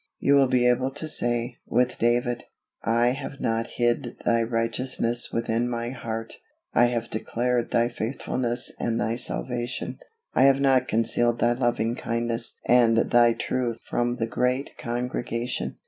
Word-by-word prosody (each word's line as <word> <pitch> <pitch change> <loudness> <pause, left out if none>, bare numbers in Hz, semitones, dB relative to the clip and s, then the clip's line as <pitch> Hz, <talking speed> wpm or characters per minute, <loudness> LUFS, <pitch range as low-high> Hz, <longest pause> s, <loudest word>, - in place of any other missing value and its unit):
You 140 - +2
will 140 -1 +6
be 125 -1 +3
able 125 +2 +2
to 145 +3 -6
say, 120 -4 -2
with 125 +1 +1
David, 120 +1 +1 0.4
"I 115 +2 +3
have 135 +2 -5
not 115 0 0
hid 120 0 0
Thy 115 0 +3
righteousness 115 +1 -1
within 115 +1 0
my 120 0 -3
heart; 115 -3 -5 0.4
I 120 - +5
have 120 -1 -2
declared 120 +2 -1
Thy 115 0 +2
faithfulness 120 +1 -2
and 115 -1 -1
Thy 110 +2 0
salvation: 120 0 -3 0.3
I - - +5
have 135 0 +5
not 135 -2 +3
concealed 115 +1 +2
Thy 120 0 +3
loving 120 -2 0
kindness 115 0 -3
and 120 -2 +5
Thy 120 -1 +6
truth 120 -1 -2
from 120 0 -1
the 115 - -1
great 125 +4 -1
congregation." 120 0 -3
120 Hz, 145 wpm, -25 LUFS, 115-125 Hz, 0.4 s, will